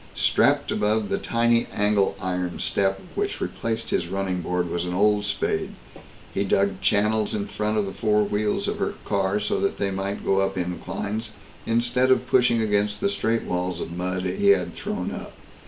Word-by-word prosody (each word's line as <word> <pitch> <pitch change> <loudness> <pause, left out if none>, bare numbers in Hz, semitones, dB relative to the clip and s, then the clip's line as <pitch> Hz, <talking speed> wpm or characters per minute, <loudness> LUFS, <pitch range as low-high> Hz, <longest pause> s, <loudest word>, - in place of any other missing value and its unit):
Strapped - - +3
above 105 0 +1
the - - 0
tiny 115 0 +2
angle 105 -1 +1
iron 90 -2 -2
step 95 -1 +1
which - - -2
replaced 115 0 -3
his - - 0
running 95 -1 -2
board 90 +1 -1
was 85 +1 -2
an 90 0 -3
old 105 +1 +3
spade. 100 - -1 0.6
He 100 - 0
dug 100 -1 +1
channels 105 +1 +2
in 100 -1 -2
front 105 +1 -2
of 105 - +1
the 95 - -5
four 105 -1 +2
wheels 105 +1 0
of - - -2
her - - -1
car, 100 0 +1
so 105 - -1
that - - 0
they 100 -1 0
might 95 +1 -3
go 95 - +3
up 95 0 0
inclines, 100 +5 -3 0.3
instead 120 +3 +2
of 130 -1 +3
pushing 120 -2 +3
against 105 -1 +1
the 200 - +1
straight 115 - 0
walls 90 -1 -2
of 85 - -5
mud 90 +1 -2
they 95 +2 0
had 100 -3 +4
thrown - - -4
up. - - -7
100 Hz, 185 wpm, -24 LUFS, 95-110 Hz, 0.6 s, had